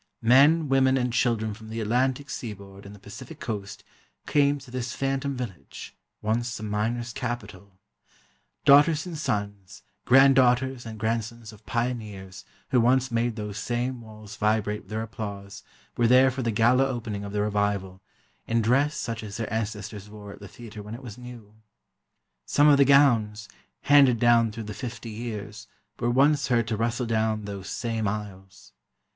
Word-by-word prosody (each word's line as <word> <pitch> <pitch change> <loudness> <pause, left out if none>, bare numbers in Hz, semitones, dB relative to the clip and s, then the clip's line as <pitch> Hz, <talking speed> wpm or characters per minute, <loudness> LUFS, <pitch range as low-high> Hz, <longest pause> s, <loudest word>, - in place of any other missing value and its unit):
Men, 145 +7 +5
women 135 0 +3
and 125 -2 -1
children 115 -3 0
from 110 +1 -12
the 115 +1 -5
Atlantic 130 +5 0
Seaboard 100 -3 -8
and 100 - -11
the - - -15
Pacific 105 - -11
Coast 105 -3 -6 0.4
came 145 -1 +2
to 135 -3 -13
this 125 -1 -4
"phantom" 135 0 -2
village, 95 - -8 0.3
once 120 +3 -1
the 110 - -8
miners' 115 +3 -2
capital. 105 -7 -6 0.9
Daughters 150 +3 +6
and 175 -2 -6
sons, 100 -8 -4 0.2
granddaughters 130 -1 +4
and 110 -1 -7
grandsons 115 0 -3
of 105 - -18
pioneers 105 -6 -4 0.3
who 125 - +3
once 130 +2 +2
made 115 0 0
those 105 0 -5
same 125 +1 -2
walls 110 -1 -12
vibrate 105 0 0
with - - -22
their 110 +1 -3
applause 100 -2 -7 0.3
were 120 - +2
there 130 +2 +6
for 130 +1 -4
the 115 - -1
gala 120 +5 +3
opening 115 -6 -4
of 100 - -6
the 105 0 -1
revival, 100 -3 -1 0.5
in 115 0 +1
dress 140 +6 +2
such 115 -1 -4
as 105 -1 -7
their 115 -2 -4
ancestors 105 -2 -4
wore 105 -1 -10
at - - -14
the 100 - -10
theatre 110 +1 -10
when 105 +2 -8
it 125 - -11
was 115 -5 -8
new. 120 -4 -11 0.9
Some 145 +1 +4
of 145 -2 +6
the 140 - +5
gowns, 115 -7 +3 0.3
handed 140 -4 +5
down 115 -1 +4
through 115 +1 -7
the 105 0 -7
fifty 115 +1 -7
years, 105 -2 -7 0.3
were 120 - 0
once 140 +3 +3
heard 115 -3 +1
to 110 - 0
rustle 115 +3 -1
down 110 -1 0
those 100 -2 -7
same 115 -3 -2
aisles. 95 -2 -7
115 Hz, 165 wpm, -26 LUFS, 105-125 Hz, 0.9 s, Daughters